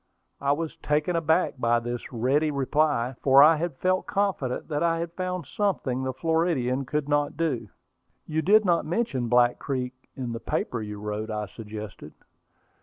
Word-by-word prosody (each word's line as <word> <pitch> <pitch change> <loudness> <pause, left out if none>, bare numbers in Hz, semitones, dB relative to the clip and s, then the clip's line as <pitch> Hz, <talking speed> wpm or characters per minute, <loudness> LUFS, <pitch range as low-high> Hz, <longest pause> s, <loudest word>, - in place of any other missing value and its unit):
I 140 0 +1
was 160 +1 -4
taken 150 +4 0
aback 160 -3 +1
by 120 -1 +3
this 120 +1 -5
ready 135 +6 +1
reply, 140 -2 +1
for 135 +1 +7
I 155 +1 +6
had 160 -3 -3
felt 185 +3 0
confident 195 -11 -1
that 150 -2 -2
I 165 -1 +2
had 170 0 -4
found 180 -2 -3
something 145 -9 -1
the 130 0 -1
Floridian 140 -3 0
could 150 +2 -2
not 145 0 0
do. 135 -10 -1 0.6
"You 160 0 -1
did 210 +5 +5
not 175 -2 +3
mention 155 - -1
Black 120 0 +3
Creek 130 -2 -3 0.2
in 125 -3 -4
the 115 - -4
paper 115 0 -2
you 105 -1 -6
wrote," 105 +1 -4
I 105 -1 -2
suggested. 105 0 -9
140 Hz, 170 wpm, -26 LUFS, 120-165 Hz, 0.6 s, for